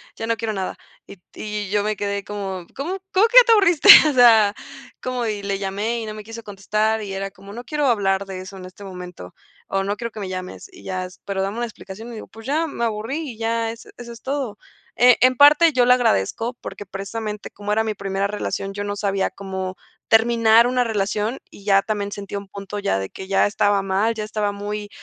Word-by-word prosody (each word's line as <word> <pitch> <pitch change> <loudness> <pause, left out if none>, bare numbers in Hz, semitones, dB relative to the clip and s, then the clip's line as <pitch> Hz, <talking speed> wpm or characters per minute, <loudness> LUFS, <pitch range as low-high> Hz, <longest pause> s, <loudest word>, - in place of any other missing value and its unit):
ya - - -5
no 230 0 0
quiero 225 -1 -3
nada". 190 -2 -4 0.3
Y 195 - -13 0.2
y 210 -2 -5
yo 205 +1 +1
me 215 0 -2
quedé 200 0 -2
como: 195 -3 -5
"¿Cómo 345 +8 -4
cómo 395 +4 +4
que - - +3
ya - - +8
te 470 - +2
aburriste? 390 -8 +4 0.2
O - - -1
sea, 225 -5 +6 0.5
¿cómo?". 250 -1 -2
Y 210 -2 -3
le 200 -1 -2
llamé 205 +4 -2
y 225 - -5
no 215 - -6
me 215 0 -9
quiso 225 +2 -9
contestar, 215 +2 -1
y 200 - -6
era 195 0 -3
como: 195 +1 -14
"No 240 +4 -8
quiero 300 -2 0
hablar 200 -4 +1
de 190 -1 -7
eso 185 +1 -9
en 190 - -10
este 185 +2 -11
momento". 180 - -9 0.3
O: 195 0 -1
"No 200 +2 -2
quiero 235 +1 -5
que 215 - -8
me 190 - -5
llames 185 - -7
y 365 - -15
ya". 185 -1 -4 0.2
"Pero 195 -1 -2
dame 195 +3 -3
una 240 - -1
explicación". 215 -1 -10
Y - - -7
dijo: 215 - -9
"Pues 225 +1 -13
ya, 315 +4 0
me 235 -5 -3
aburrí 235 +7 -3
y 225 - -13
ya 230 0 -1
eso 230 0 -12
eso 235 -1 -9
es 230 - -14
todo". 265 -6 -3 0.4
Eh, 250 0 +8
en 255 0 +4
parte, 300 +4 +7
yo 255 -4 +3
le 250 - +6
agradezco, 235 - 0
porque 205 - -8
precisamente, 210 +2 -6
como 205 0 -5
era 220 +1 +1
mi 215 - -1
primera 195 0 -2
relación, 200 -1 -4
yo 205 0 -4
no 205 0 -4
sabía 200 -1 0
cómo 190 -1 -6 0.3
terminar 230 0 +5
una 250 0 +1
relación, 215 +1 -1
y 200 - -15
ya 195 -1 +4
también 205 -1 -3
sentí 200 0 -7
un 200 -1 -6
punto 200 +1 -7
ya 200 - 0
de 95 - -5
que 190 - -9
ya 195 - +3
estaba 205 -1 +1
mal, 195 +4 0
ya 215 -1 -4
estaba 210 -1 -2
muy 205 +1 -5
210 Hz, 235 wpm, -22 LUFS, 195-230 Hz, 0.5 s, ya